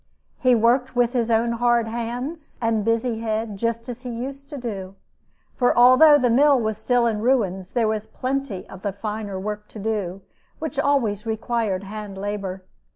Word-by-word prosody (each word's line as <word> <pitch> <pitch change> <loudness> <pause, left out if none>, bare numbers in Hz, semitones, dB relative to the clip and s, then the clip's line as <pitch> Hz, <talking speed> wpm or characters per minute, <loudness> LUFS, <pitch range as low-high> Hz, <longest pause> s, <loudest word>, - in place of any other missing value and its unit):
He 255 -1 +4
worked 245 +3 +2
with 245 0 +2
his 235 -2 0
own 230 +1 +2
hard 235 -1 +2
hands 245 +7 -5
and 225 -2 +1
busy 230 +1 0
head 220 -1 -2
just 230 +2 -2
as 245 0 -6
he 250 - -6
used 270 +4 -6
to 290 - -6
do; 195 -6 -6 0.6
for 245 -2 +2
although 255 +5 +8
the 250 -4 +2
mill 280 +2 +5
was 220 -2 -2
still 245 -1 +2
in 220 -2 0
ruins, 195 -7 0
there 235 -3 +2
was 215 0 -2
plenty 255 -7 -3
of 190 - -11
the 200 -1 -2
finer 210 -1 -4
work 210 +1 -5
to - - -12
do, 195 -3 -3 0.3
which 310 -3 -4
always 230 -8 +1
required 220 -3 -1
hand 205 -1 -7
labor. 195 -2 -4
230 Hz, 175 wpm, -23 LUFS, 210-250 Hz, 0.6 s, although